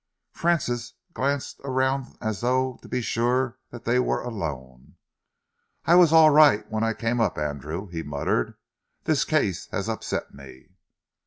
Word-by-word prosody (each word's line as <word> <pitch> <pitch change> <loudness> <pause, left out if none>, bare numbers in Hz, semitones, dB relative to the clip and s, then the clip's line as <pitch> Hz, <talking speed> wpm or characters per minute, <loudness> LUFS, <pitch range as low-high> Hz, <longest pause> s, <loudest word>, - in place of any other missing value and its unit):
Francis 130 -8 -1 0.2
glanced 140 +1 -2
around 130 0 -1
as 110 -2 -3
though 130 +1 0
to - - -13
be 125 0 -1
sure 125 +3 0
that 120 - -11
they 120 +2 +2
were 125 - 0
alone. 70 - -6 0.9
"I 170 - +4
was 175 -3 +7
all 160 -1 +7
right 145 -8 +5
when 110 0 -1
I 115 0 +1
came 115 +2 -1
up, 110 - 0
Andrew," 75 +5 -4
he 85 -2 -5
muttered. 70 -5 -1 0.5
"This - - +2
case - - 0
has - - -3
upset - - -3
me." 70 +4 -14
120 Hz, 150 wpm, -25 LUFS, 85-130 Hz, 0.9 s, was